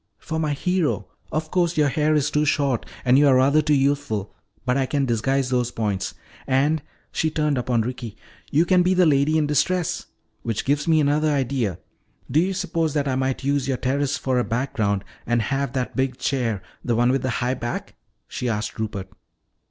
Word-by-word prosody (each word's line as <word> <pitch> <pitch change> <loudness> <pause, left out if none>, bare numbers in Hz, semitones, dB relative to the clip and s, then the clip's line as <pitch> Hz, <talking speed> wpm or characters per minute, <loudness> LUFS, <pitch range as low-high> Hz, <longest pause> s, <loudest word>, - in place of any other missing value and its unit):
"For 160 0 -4
my 155 -2 0
hero. 180 +2 0 0.3
Of 155 0 -2
course 175 -2 +1
your 150 -2 +4
hair 155 +2 +2
is 150 -1 +1
too 150 - +2
short 140 -5 +1 0.2
and 130 +2 +5
you 145 - +5
are 135 - +6
rather 140 +4 +4
too 150 0 +2
youthful, 135 -7 0 0.3
but 125 0 +2
I 135 -1 +1
can 140 0 0
disguise 130 +3 0
those 125 -1 +1
points. 105 -5 -2 0.3
And," 145 +4 +2 0.3
she 160 - 0
turned 150 -2 0
upon 125 -2 +1
Ricky, 120 -2 -6 0.3
"you 160 +4 +3
can 180 0 +4
be 185 +1 +2
the 180 -1 +5
lady 150 +1 +3
in 155 - +2
distress. 165 +4 0 0.3
Which 115 -3 -3
gives 145 +3 +1
me 160 -1 +4
another 150 +2 +2
idea. 130 - 0 0.5
Do 150 - +4
you 185 +3 +1
suppose 165 -5 -1
that 145 -1 +1
I 130 - 0
might 130 0 -1
use 140 -1 0
your 135 -2 0
terrace 140 +2 0
for 130 -2 0
a - - +2
background 110 -6 -1 0.2
and 120 0 +2
have 135 +2 -1
that 130 -2 -2
big 130 -1 0
chair, 115 -8 -1 0.2
the 120 - 0
one 120 +2 +3
with 135 -1 +1
the 130 - -1
high 125 +1 0
back?" 120 -2 -4 0.3
she 125 - -3
asked 110 0 -3
Rupert. 100 -3 -3
135 Hz, 200 wpm, -23 LUFS, 125-150 Hz, 0.5 s, are